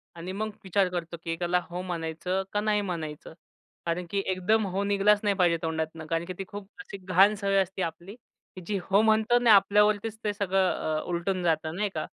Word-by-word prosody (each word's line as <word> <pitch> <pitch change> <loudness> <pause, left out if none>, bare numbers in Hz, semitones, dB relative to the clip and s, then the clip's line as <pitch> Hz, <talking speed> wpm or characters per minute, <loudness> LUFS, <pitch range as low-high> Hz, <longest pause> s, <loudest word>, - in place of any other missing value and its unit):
आणि 170 +2 -6
मग 215 +3 -3
विचार 190 0 +2
करतो 170 -1 -5
की 165 - -3
एकाला 175 +2 0
हो 175 +1 -4
म्हणायचं 180 +2 -3
का 205 - +1
नाही 210 -1 +1
म्हणायचं? 160 -6 -5 0.5
कारण 170 +1 -2
की 200 -1 0
एकदम 200 +4 +1
हो 195 - 0
निघालाच 205 +1 +3
नाही 200 -1 +2
पाहिजे 175 -3 +3
तोंडातनं 160 0 -3
कारण 165 +2 -2
की 185 - -5
ती 195 - -4
खूप 205 -1 -8
अशी 205 -3 -8
घाण 190 +2 +4
सवय 195 -1 0
असते 190 0 -4
आपली 170 +6 -6
की 210 -5 -17
जी 210 - 0
हो 200 +2 +5
म्हणतो 220 +2 +3
आणि 245 -1 +3
आपल्यावरतीच 210 +2 +4
ते 210 - 0
सगळं 195 -2 +1 0.3
अ, - - -4
उलटून 180 +1 -2
जातं, 160 -1 0
नाही 205 +2 -1
का? 155 - -2
190 Hz, 200 wpm, -27 LUFS, 170-205 Hz, 0.5 s, हो